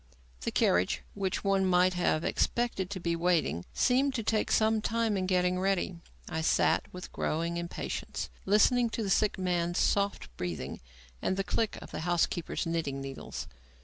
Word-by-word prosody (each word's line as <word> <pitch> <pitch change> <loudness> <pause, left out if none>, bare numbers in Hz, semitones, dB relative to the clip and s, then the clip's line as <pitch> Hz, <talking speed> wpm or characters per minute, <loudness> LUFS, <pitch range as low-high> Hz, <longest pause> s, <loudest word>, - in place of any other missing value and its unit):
The - - -2
carriage, 90 +1 +2
which 195 -2 -2
one 195 -1 +2
might 185 0 +4
have 175 -3 +1
expected 235 -5 0
to 190 - -4
be 170 -1 0
waiting, 165 - +1
seemed 265 +2 +2
to 230 - -1
take 215 0 +1
some 220 0 +3
time 230 -1 0
in 185 -1 -1
getting 180 -1 +2
ready. 190 -2 0 0.3
I 160 -2 -2
sat, 160 - +2
with 180 0 -8
growing 170 +2 -1
impatience, 170 0 -4 0.2
listening 230 +4 +4
to 225 - -1
the 195 - -1
sick 210 +1 +2
man's 175 -2 0
soft 200 - 0
breathing 80 -7 -4 0.4
and 190 - 0
the 195 - +1
click 220 +2 -1
of - - -12
the - - -4
housekeeper's 175 0 0
knitting 165 -5 -2
needles. 135 0 -6
180 Hz, 165 wpm, -30 LUFS, 170-205 Hz, 0.4 s, might